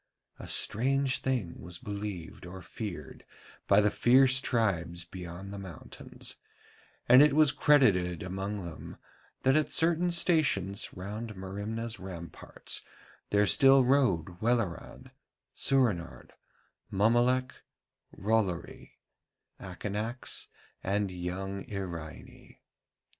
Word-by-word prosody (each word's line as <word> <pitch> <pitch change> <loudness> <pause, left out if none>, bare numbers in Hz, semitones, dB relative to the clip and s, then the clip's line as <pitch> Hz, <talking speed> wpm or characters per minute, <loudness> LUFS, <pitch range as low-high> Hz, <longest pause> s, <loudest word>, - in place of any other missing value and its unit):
A - - -8
strange 135 +3 +2
thing 120 -11 -2
was 90 -1 -7
believed 100 -4 -6
or 95 +1 -9
feared 90 -10 -7 0.4
by 100 +1 +6
the 105 0 +2
fierce 130 +2 +5
tribes 85 -7 -1
beyond 90 +2 -8
the 100 - -6
mountains, 95 -5 -8 0.7
and 125 +2 +8
it 150 -1 +5
was 155 -2 +5
credited 90 - +3
among 95 +1 -4
them 85 -2 -9 0.5
that 130 +1 +4
at 155 -1 +2
certain 170 +2 +2
stations 155 - +1
round 105 +4 -6
Merimna's 105 +4 -5
ramparts 85 -3 -7 0.5
there 105 0 +3
still 135 +8 +6
rode 95 - +1
Welleran, 115 -6 -2 0.4
Soorenard, 115 -11 0 0.6
Mommolek, 120 +5 +2 0.5
Rollory, 100 -4 -2 0.7
Akanax, 105 +6 -4 0.4
and 100 0 0
young 95 +2 -5
Iraine. 85 -6 -8
100 Hz, 100 wpm, -30 LUFS, 90-125 Hz, 0.7 s, and